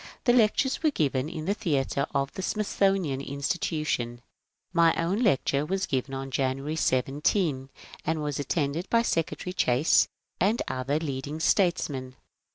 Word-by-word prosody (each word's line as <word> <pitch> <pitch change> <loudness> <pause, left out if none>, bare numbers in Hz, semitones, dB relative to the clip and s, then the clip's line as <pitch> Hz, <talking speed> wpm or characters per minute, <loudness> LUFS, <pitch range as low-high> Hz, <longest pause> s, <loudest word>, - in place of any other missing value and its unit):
The 240 - +4
lectures 245 +3 +3
were 315 - +4
given 145 - 0
in 160 -2 -6
the 200 - +1
theatre 140 -7 -1
of 140 0 0
the - - -5
Smithsonian 195 -8 0
Insti 140 +5 -2
tution. 125 -8 -1 0.6
My 165 -1 +4
own 180 +7 0
lecture 140 - +2
was 190 +5 -1
given 135 0 -2
on 135 0 -5
January 135 +3 -1
17, 135 - 0 0.3
and 160 -1 -1
was 145 -2 -2
attended 145 +4 -1
by 230 0 +3
Secretary 175 -1 -2
Chase 130 -2 +3 0.3
and 210 +6 +2
other 130 +3 -1
leading 145 -1 -4
statesmen. 145 -8 +1
150 Hz, 145 wpm, -27 LUFS, 135-185 Hz, 0.6 s, The